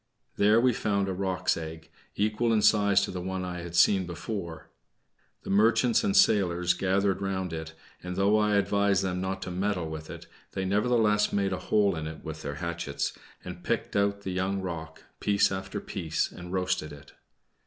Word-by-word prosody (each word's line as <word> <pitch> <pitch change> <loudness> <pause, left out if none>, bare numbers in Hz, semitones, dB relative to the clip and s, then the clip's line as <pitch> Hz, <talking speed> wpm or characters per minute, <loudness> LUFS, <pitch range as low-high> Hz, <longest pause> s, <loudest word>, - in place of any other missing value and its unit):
There 105 +2 +5
we 125 +1 +3
found 100 -2 0
a 95 - -1
roc's 95 0 0
egg, 80 0 -8 0.2
equal 110 +3 +1
in 110 -2 +2
size 100 -2 +4
to - - -2
the 90 - -5
one 95 0 -3
I 90 -1 -5
had 85 0 -7
seen 95 0 +4
before. 85 -1 -6 0.7
The - - -5
merchants 115 +4 +4
and 200 -2 +2
sailors 90 - +3
gathered 95 +2 0
round 95 -3 -2
it, 80 0 -6 0.3
and 90 0 -5
though 100 +2 +3
I 105 -1 +2
advised 100 -1 +2
them 90 -1 -2
not 95 0 -3
to 90 - -5
meddle 90 -2 -1
with 80 0 -7
it, - - -9 0.3
they 95 - -2
nevertheless 105 +1 +2
made 100 -1 0
a 90 - -3
hole 100 -3 +3
in 80 -1 -4
it 80 -1 -8
with 80 -1 -7
their 70 - -5
hatchets, 75 -3 -3 0.3
and - - -8
picked - - -2
out 100 0 +1
the 95 - -4
young 95 +2 -1
roc, 80 -3 -6 0.2
piece 100 -1 +2
after 95 +1 -4
piece, 80 -5 -2
and 90 0 -9
roasted 90 -4 -1
it. 75 0 -13
95 Hz, 185 wpm, -28 LUFS, 85-100 Hz, 0.7 s, There